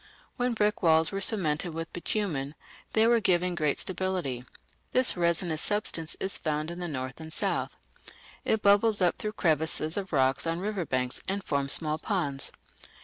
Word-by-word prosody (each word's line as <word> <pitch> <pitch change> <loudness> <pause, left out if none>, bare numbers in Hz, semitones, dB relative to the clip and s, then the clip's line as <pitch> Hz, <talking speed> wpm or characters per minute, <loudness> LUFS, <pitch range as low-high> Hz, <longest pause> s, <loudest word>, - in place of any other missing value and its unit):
When 245 -1 -1
brick 210 -1 0
walls 160 -2 +4
were 195 - -3
cemented 170 -6 +2
with 165 0 -5
bitumen 160 -7 -3 0.4
they 220 0 +4
were 235 0 +4
given 180 -3 +1
great 150 -4 0
stability. 185 -10 -2 0.5
This 255 0 +6
resinous 170 -2 0
substance 190 -6 0
is 195 - -1
found 155 0 -2
in 175 - -7
the 175 - -4
north 130 -3 -5
and 160 0 -9
south. - - -2 0.7
It 220 - 0
bubbles 205 +1 +4
up 180 -2 +2
through 215 0 -4
crevices 160 -2 +1
of 195 -2 -4
rocks 135 +1 +1
on 165 +1 -1
river 195 -4 -3
banks 125 -1 -1
and 195 0 -2
forms 140 -1 +1
small 155 -1 0
ponds. 145 -10 -2
170 Hz, 165 wpm, -28 LUFS, 155-200 Hz, 0.7 s, This